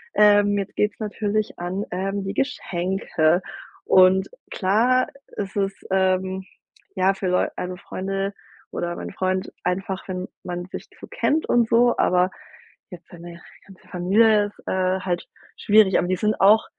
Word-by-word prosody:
Ähm, 205 -1 +5
jetzt 195 0 -4
geht’s 210 0 +1
natürlich 215 0 -2
an, 180 +3 -3
ähm, 195 +2 -2
die 195 +1 -4
Geschenke 180 - 0 0.4
und 185 0 +5 0.2
klar 230 +7 +2 0.3
ist 195 -2 -4
es, 195 0 0 0.2
ähm, 190 0 +1 0.5
ja 190 +1 +3
für 195 -1 -4
Leu 180 0 +2
ähm, 180 0 -4
Freunde 195 +1 -4 0.4
oder 175 0 -3
meinen - - -6
Freund 185 0 -1
einfach, 190 +1 -3
wenn 185 0 -4 0.2
man 175 0 -5
sich - - -8
so - - -9
kennt 310 +2 0
und 235 -2 +3
so, 240 +1 +4
aber 180 +1 +2 0.6
jetzt 180 -3 -12
seine 170 -1 -11 0.3
ganze 195 -2 -17
Familie 205 +4 +3
ist, 205 - -17
äh, 185 0 0
halt 175 -2 -3 0.3
schwierig. 205 -2 +4
Aber 175 - -1
die 185 - +1
sind 215 +4 -1
auch 210 +3 +6
190 Hz, 150 wpm, -23 LUFS, 185-205 Hz, 0.6 s, auch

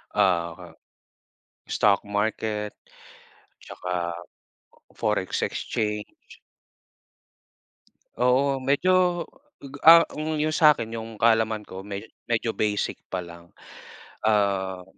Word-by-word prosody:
ah, 85 -3 0 1.0
Stock 100 -1 +3
market 105 0 -2 0.9
tsaka 90 -1 -4 0.8
Forex 105 -4 -1
Exchange. 105 -1 -2 2.1
Oo, 135 +2 +2
medyo, 175 +6 +2 0.6
ah, 165 0 +10 0.2
yung 155 0 -1
sa'kin, 150 -8 +4
yung 115 -1 -6
kaalaman 110 -1 +2
ko 95 - -9
medyo 100 +2 -8 0.2
medyo 115 -1 0
basic 105 -2 -1
pa 90 -1 -4
lang. 85 0 -13 0.8
Ah, 100 -3 +1
110 Hz, 80 wpm, -25 LUFS, 95-125 Hz, 2.1 s, ah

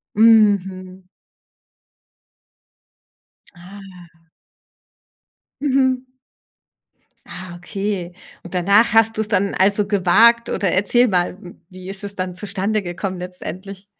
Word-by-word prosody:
Mhm. 195 -4 +3 2.5
Ah. 180 -2 -14 1.4
Mhm. 260 -2 +1 1.2
Ah, 175 -2 -10
okay. 185 0 -5 0.3
Und 175 - -11
danach 200 +5 +3
hast 225 0 +3
du's 220 -1 -1
dann 200 -2 0
also, 200 +2 +2
gewagt 220 +5 +3
oder 190 -4 -1
erzähl 240 +6 +2
mal, 180 -2 -1 0.3
wie 185 0 -11
ist 195 +1 -5
es 200 0 -5
dann 185 -1 -4
zustande 205 +2 -2
gekommen 185 +1 -5
letztendlich? 185 +2 -9
195 Hz, 95 wpm, -19 LUFS, 185-210 Hz, 2.5 s, Mhm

